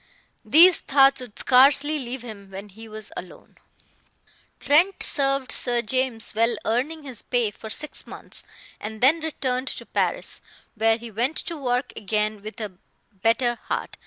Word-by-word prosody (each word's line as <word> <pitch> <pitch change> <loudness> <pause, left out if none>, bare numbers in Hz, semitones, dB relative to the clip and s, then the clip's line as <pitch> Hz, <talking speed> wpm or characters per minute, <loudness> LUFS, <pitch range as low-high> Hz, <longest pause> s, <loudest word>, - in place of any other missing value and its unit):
These 345 +3 +7
thoughts 275 -1 +4
would 245 -5 -11
scarcely 280 +4 +4
leave 250 -1 -6
him 205 -4 -10
when 195 +2 -9
he 220 +3 -13
was 215 -1 -4
alone. 180 - -10 1.0
Trent 345 +7 +3
served 275 -1 +1
Sir 240 -1 -1
James, 250 0 +1
well 230 +2 +1
earning 285 +8 -1
his 260 -6 -4
pay, 240 -4 0
for 220 +2 -10
six 300 +7 -2
months, - - -8 0.4
and 215 +1 -6
then 285 +6 +5
returned 265 -5 -3
to - - -5
Paris, - - 0 0.3
where 225 +1 +2
he 235 0 -10
went 245 +8 -1
to 335 - -5
work 250 -3 -2
again 210 0 -1
with 215 +2 -9
a 210 -3 -4 0.4
better 230 +4 0
heart. - - -4
245 Hz, 155 wpm, -24 LUFS, 220-275 Hz, 1.0 s, These